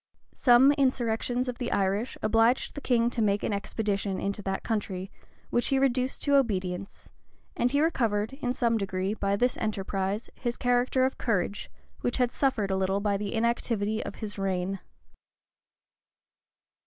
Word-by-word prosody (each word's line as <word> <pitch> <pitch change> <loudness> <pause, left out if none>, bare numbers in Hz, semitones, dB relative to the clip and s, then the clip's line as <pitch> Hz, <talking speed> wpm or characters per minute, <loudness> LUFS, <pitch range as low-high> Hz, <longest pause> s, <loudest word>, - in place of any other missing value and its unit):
[] - - -37
Some 250 +3 +8
insurrections 250 -3 0
of 250 -1 -4
the 245 - -2
Irish 200 +4 0
obliged 225 +3 +3
the 285 - -7
king 240 -2 +2
to 235 - -2
make 205 -1 +1
an - - 0
expedition 200 -1 -2
into 200 +1 -2
that 195 -1 -3
country, 195 -4 -3 0.4
which 240 - +2
he 270 - +2
reduced 260 -1 +1
to 285 -1 +4
obedience; 195 -6 -2 0.4
and 245 - +2
he 285 +3 +1
recovered, 230 -8 +1
in 260 -3 -2
some 235 -3 +1
degree, 190 0 -1
by 200 -2 0
this 245 +4 +1
enterprise, 200 0 -2
his 240 -2 -3
character 245 +1 +2
of 265 - -2
courage, 205 -3 -1 0.3
which 245 - -1
had 250 -2 +2
suffered 230 -9 0
a 190 - +1
little 190 +1 +1
by 205 0 0
the 200 0 -3
inactivity 225 -2 0
of - - -6
his 210 -2 -6
reign. 190 0 -1
220 Hz, 160 wpm, -28 LUFS, 200-245 Hz, 0.4 s, Some